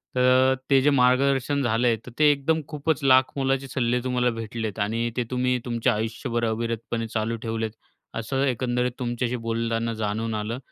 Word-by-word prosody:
तर 130 +1 +4 0.2
ते 135 - +6
जे 145 - +4
मार्गदर्शन 135 +1 +3
झालं 120 +1 +2
आहे 115 - +3
तर 125 - -9
ते 150 - +6
एकदम 150 +3 0
खूपच 150 0 -2
लाखमोलाचे 135 0 +3
सल्ले 125 -1 0
तुम्हाला 125 -1 +1
भेटलेत. 115 -2 -4
आणि 115 +3 -1
ते 125 - +1
तुम्ही 125 0 +1
तुमच्या 120 -1 +1
आयुष्यभर 115 +2 -2
अविरतपणे 115 0 -2
चालू 110 +1 -2
ठेवलेत. 110 -1 -2 0.4
असं 135 +4 -2
एकंदरीत 125 0 0
तुमच्याशी 120 0 -2
बोलताना 115 0 -1
जाणून 110 +2 -2
आलं. 110 +3 -3
120 Hz, 155 wpm, -25 LUFS, 115-130 Hz, 0.4 s, ते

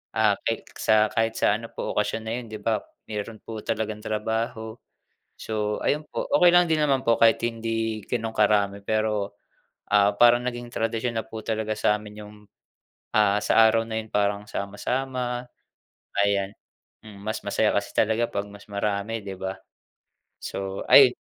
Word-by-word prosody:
ah, 110 -2 +4
ka - - 0 0.3
sa 110 - +3 0.2
kahit 115 0 +1
sa - - +3
ano 115 0 -9
po - - -4
okasyon 110 +1 0
na 110 - -3
yun 120 - -8
'di 110 - -6
ba 110 -1 +1 0.3
meron 110 +1 -5
po 110 -1 -6
talagang 110 -1 -2
trabaho. 110 +1 -3 0.6
So 105 -1 -2
ayun 150 +1 0
po, - - -3
okey 175 -1 +7
lang 175 0 +7
din 155 - +3
naman 140 -3 +2
po 115 0 +4
kahit 115 -1 +5
hindi 115 -2 -2
ganun 115 -2 -2
karami, 100 -1 +3
pero, 110 -2 0 0.6
ah, 100 0 +5
parang 120 +1 +6
naging 120 -1 -4
tradisyon 115 +1 -1
na - - -5
po 110 0 -7
talaga 110 -1 -1
sa'min 105 0 -1
yung, 105 0 -12 0.8
ah, 105 -1 +4
sa 115 - +6
araw 115 0 +3
na 110 -1 -3
yun, 110 - -11
parang 100 0 +1
sama-sama. 125 +4 -2 0.8
Ayan, 100 -1 0 0.6
hmm, 100 -2 -11
mas 110 +1 -2
masaya 105 +1 +2
kasi 100 0 -1
talaga 110 +2 +2
'pag 100 0 -3
mas 105 0 -13
marami 100 +2 -2
'di 95 -1 -6
ba? 95 0 -3 0.9
So, 95 0 -4
ay - - +9
110 Hz, 165 wpm, -25 LUFS, 105-115 Hz, 0.9 s, ay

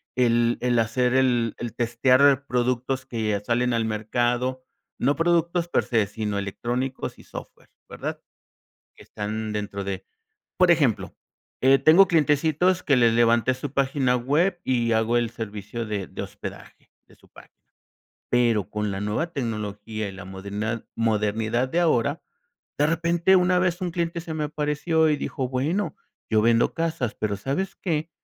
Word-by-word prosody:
el 120 -1 +2
el 125 -1 +2
hacer 125 +3 +1
el 125 -4 +2
el 120 -2 -5
testear 130 +4 +3
productos 125 +2 -1
que 110 -5 -1
salen 120 +1 +1
al 115 -1 +1
mercado, 120 +4 -1 0.4
no 140 +3 +2
productos 170 +1 +1
per - - +1
se, 115 -4 +1
sino 105 0 -3
electrónicos 120 +6 -3
y - - -14
software, - - -11 0.2
¿verdad?, - - -5 0.8
que - - -14
están 110 +1 -4
dentro 100 -1 -4
de 95 -1 -4 0.5
Por 180 -1 +5
ejemplo, 145 -10 +2 0.5
eh, 135 +1 +6
tengo 180 +5 +6
clientecitos 160 +3 +2
que 140 - +3
les 115 -2 +4
levanté 115 +1 +3
su 130 +1 -6
página 135 -2 +1
web 155 +9 +1
y 120 -3 +1
hago 110 +2 +2
el 120 -1 +1
servicio 115 0 -6
de 100 -3 -3
de - - -7
hospedaje - - -10 0.2
de - - -19
su - - -25
página, - - -17 0.8
pero 115 -6 +2
con 105 -1 -2
la 95 - -4
nueva 105 +12 -2
tecnología 110 -4 -4
y - - -4
en 95 - -12
la 95 - -9
modernad 100 +4 -4
modernidad 110 +2 0
de 165 - -1
ahora, 155 -9 +1 0.6
de 145 - +4
repente 170 +3 +3
una 180 0 +3
vez 180 0 0
un 180 -2 -2
cliente 170 0 -2
se 165 -1 -6
me 155 - -2
apareció 150 +2 +1
y 150 - +2
dijo, 130 -2 -3
"Bueno, 150 +11 -1 0.3
yo 110 -1 +3
vendo 115 +1 +3
casas 160 -8 -2
pero, 105 -2 -1
¿sabes 140 - -2
qué? 160 -2 -2
125 Hz, 160 wpm, -24 LUFS, 110-150 Hz, 0.8 s, eh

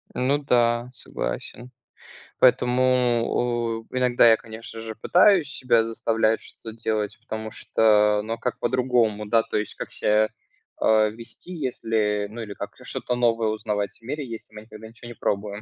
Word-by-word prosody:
Ну 135 +3 +2
да, 120 -3 +1
согласен. 120 - -5 0.7
Поэтому, 125 0 +4 1.0
о, - - -28
иногда 125 -2 +4
я, 110 - +6
конечно 115 0 -9
же, 110 -1 -6
пытаюсь 180 - +4
себя 120 -5 +2
заставлять 115 -1 0
что-то 110 -1 -11
делать, 110 -3 -2
потому 110 -1 -6
что, 105 -1 +3
ну, 115 +1 -3
а - - -5
как 125 - -2
по-другому? 120 -4 +1
Да, 115 +1 +3
то - - -3
есть 105 - -3
как - - -7
ся, 110 +1 +2 0.5
а, 110 -1 +3
вести, 115 +10 -11
если, 110 -8 -1
ну, 115 +2 -7
или 105 -2 -6
как - - -7
что-то 125 - -3
новое 115 -2 +2
узнавать 105 -2 -3
в - - -39
мире, 140 +4 -5
если 110 -1 -9
мы 105 - -8
никогда 110 0 -12
ничего 115 +1 -13
не - - -7
пробуем, 100 +1 -2
115 Hz, 160 wpm, -24 LUFS, 110-125 Hz, 1.0 s, я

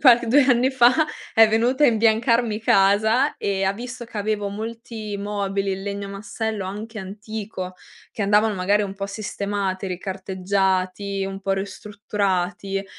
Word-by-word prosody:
qual 250 -4 +8
2 275 +5 +5
anni 255 0 +3
fa, 250 -1 +6 0.4
è 225 0 +8
venuto 240 +6 +2
a - - +8
imbiancarmi 230 -1 +2
casa, 215 +7 +3
e 195 -1 -1
ha 195 0 +2
visto 240 +3 -7
che 230 -2 -7
avevo 205 0 -1
molti 220 0 -6
mobili 200 -1 -2
in 190 0 -3
legno 200 0 -4
massello, 205 +1 -4
anche 215 +4 -6
antico, 200 -1 -6 0.4
che 215 - -4
andavano 210 +2 +3
magari 200 +3 +2
un 195 -1 -4
po' 195 0 -4
sistemati, 200 -1 -3
ricarteggiati, 190 +1 -1
un 195 0 -5
po' 195 0 -1
ristrutturati; 195 -1 -2
205 Hz, 145 wpm, -23 LUFS, 195-220 Hz, 0.4 s, qual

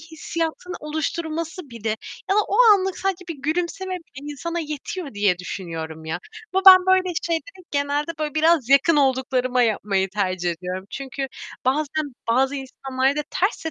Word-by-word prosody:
hissiyatını 330 +2 -4
oluşturması 315 +1 -3
bile 230 -2 -5 0.4
ya 390 - +4
da - - +6
o 405 - 0 0.2
anlık 380 -1 -1
sadece 385 -1 -2
bir 335 - -3
gülümseme 355 +5 -1
bile 295 -4 -8
insana 335 +4 -4
yetiyor 305 - -5
diye 205 -3 +2
düşünüyorum 165 -3 -6
ya, 160 +2 -3 0.4
ve - - +4
ben 370 -1 +10
böyle 375 -1 +3
şeyleri 365 +3 -3
genelde 285 +2 0
böyle 300 -2 -2
biraz 315 -4 +3
yakın 280 +4 +5
olduklarıma 260 -2 +2
yapmayı 200 -4 +1
tercih 185 -3 -1
ediyorum. 180 +2 -5
Çünkü 275 0 -4 0.4
bazen 290 +1 0
bazı 265 +4 +3
insanlarda 270 +1 -1
ters 385 +1 0
de 320 - -1
290 Hz, 150 wpm, -23 LUFS, 250-335 Hz, 0.4 s, ben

